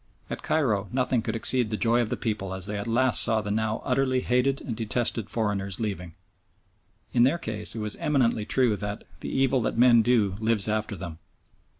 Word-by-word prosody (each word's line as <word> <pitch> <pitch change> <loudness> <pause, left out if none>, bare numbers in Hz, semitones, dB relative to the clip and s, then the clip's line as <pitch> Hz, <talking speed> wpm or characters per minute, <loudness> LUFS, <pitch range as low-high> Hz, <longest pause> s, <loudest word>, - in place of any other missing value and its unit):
At - - -5
Cairo 110 -10 0
nothing 125 -1 0
could 110 0 -3
exceed 120 0 +3
the 110 - -2
joy 120 +2 +2
of 115 - -2
the - - -2
people 100 -4 -3
as 95 -1 -3
they 105 0 -3
at 100 +2 -4
last 120 +2 +4
saw 110 -1 +3
the 105 -1 -4
now 110 +1 -1
utterly 130 0 +1
hated 125 +3 +1
and 115 - -5
detested 115 -1 -1
foreigners 100 -3 -1
leaving. 95 -6 -4 1.0
In 120 - +3
their 135 +8 +4
case 105 -7 -5
it - - -4
was 105 -1 -2
eminently 115 -7 0
true 125 -5 +2
that 105 0 -5 0.2
"the - - -6
evil 135 -1 +1
that 115 - -2
men 120 -1 +6
do 110 -5 +1
lives 110 -2 +1
after 110 -1 -1
them." 85 -3 -8
110 Hz, 200 wpm, -26 LUFS, 105-125 Hz, 1.0 s, men